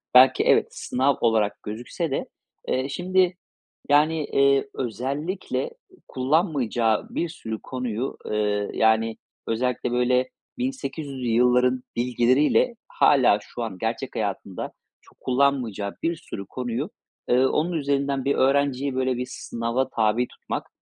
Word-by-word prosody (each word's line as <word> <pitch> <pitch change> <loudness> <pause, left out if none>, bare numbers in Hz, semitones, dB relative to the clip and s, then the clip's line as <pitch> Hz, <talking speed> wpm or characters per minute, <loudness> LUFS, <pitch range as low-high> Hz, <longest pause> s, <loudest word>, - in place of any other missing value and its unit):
belki 130 +1 +7
evet, - - +4
sınav 135 +2 0
olarak 110 -3 +1
gözükse 120 - -4
de, 135 - -2 0.4
eee, 130 +2 0
şimdi, 185 +3 +1 0.5
yani, 155 +2 +4
eee, 140 0 +3
özellikle 140 - -3 0.4
kullanmayacağı 130 - +1
bir 170 - -2
sürü 110 -8 -6
konuyu, 125 -1 -3
eee, 105 -1 0
yani, 110 0 +2 0.3
özellikle 125 +1 -1
böyle 125 +1 +2 0.3
1800'lü 145 - -4
yılların 125 +2 +3
bilgileriyle 125 - +3
hâlâ 130 -7 +4
şu 120 +3 -6
an 100 -5 -5
gerçek - - -3
hayatında - - -3 0.3
çok - - -24
kullanmayacağı 125 -7 0
bir 170 0 +1
sürü 100 -10 -8
konuyu, 125 - -3 0.4
eee, 125 +2 +4
onun 155 +6 +1
üzerinden 140 -3 0
bir 140 - +2
öğrenciyi 135 0 +2
böyle 130 -1 0
bir 125 - -2
sınava 115 +3 -2
tabi 115 +1 +1
tutmak, - - -6
130 Hz, 120 wpm, -24 LUFS, 120-140 Hz, 0.5 s, belki